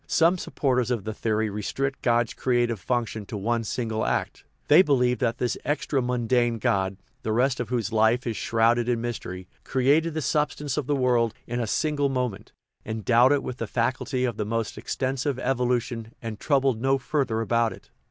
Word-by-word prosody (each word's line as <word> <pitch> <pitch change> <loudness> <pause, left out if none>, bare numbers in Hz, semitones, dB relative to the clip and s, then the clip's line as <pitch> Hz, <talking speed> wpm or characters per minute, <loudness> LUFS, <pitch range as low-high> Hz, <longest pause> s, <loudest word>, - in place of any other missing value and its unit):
Some 170 +2 +3
supporters 125 -7 0
of 120 -5 -1
the 110 - -4
theory 110 0 0
restrict 135 +7 -3
God's 120 -1 +2
creative 120 -3 0
function 115 +1 -2
to 105 - -5
one 115 +3 0
single 110 0 -2
act; - - -2 0.2
they 155 +5 +8
believe 125 -6 +2
that 120 -2 0
this 125 -2 -1
extramundane 125 -5 0
God 100 -5 0 0.2
(the 110 - -2
rest 125 +3 +2
of 120 -3 -3
whose 120 -3 -1
life 110 +3 +3
is 115 -2 -2
shroud 115 +2 +2
ed 120 0 -1
in 120 -2 +1
mystery) 105 -6 -5 0.2
created 145 +5 +2
the 155 - -1
substance 150 0 -1
of 150 -4 -2
the 145 - +1
world 120 -4 +2
in 120 +1 -3
a 115 - -1
single 145 +3 0
moment, 125 -6 -3 0.3
endowed 115 +4 +3
it 145 -1 +2
with 125 - -5
the - - -4
faculty 125 +2 -1
of 120 -4 -2
the 105 - -1
most 115 +1 -2
extensive 135 +1 -2
evolution, 125 -3 -1
and 110 -3 -6
troubled 135 -5 +1
no 135 +1 +3
further 130 -4 -1
about 115 0 +1
it. - - -13
120 Hz, 180 wpm, -25 LUFS, 115-130 Hz, 0.3 s, they